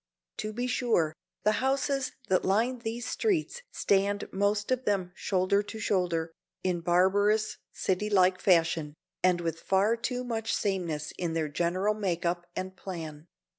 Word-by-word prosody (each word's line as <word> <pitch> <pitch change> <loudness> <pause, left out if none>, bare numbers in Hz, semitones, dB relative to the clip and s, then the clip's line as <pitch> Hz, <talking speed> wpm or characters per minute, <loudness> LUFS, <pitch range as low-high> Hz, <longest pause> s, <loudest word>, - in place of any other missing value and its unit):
To 215 - -3
be 245 +3 -2
sure, 235 -11 +1 0.3
the 215 - +4
houses 270 0 +1 0.2
that 185 -2 +2
line 230 +6 +1
these 235 +1 -4
streets 430 +3 0
stand 200 +1 +1
most 205 +3 +1
of 255 0 0
them 190 -3 0
shoulder 190 +1 +1
to 205 +2 -8
shoulder, 175 -5 0 0.3
in 180 -2 0
barbarous, 200 +5 +3
city 190 +3 -1
like 185 -2 +4
fashion, 165 -4 +2 0.3
and 180 -1 +3
with 165 -1 -2
far 195 +6 +2
too 250 +2 -3
much 225 -2 -1
sameness 170 -7 -2
in 170 -3 -1
their 160 -2 -1
general 180 +7 +1
make 185 -5 -2
up 175 0 -1
and 185 0 -4
plan. 160 -5 -7
195 Hz, 150 wpm, -29 LUFS, 175-215 Hz, 0.3 s, the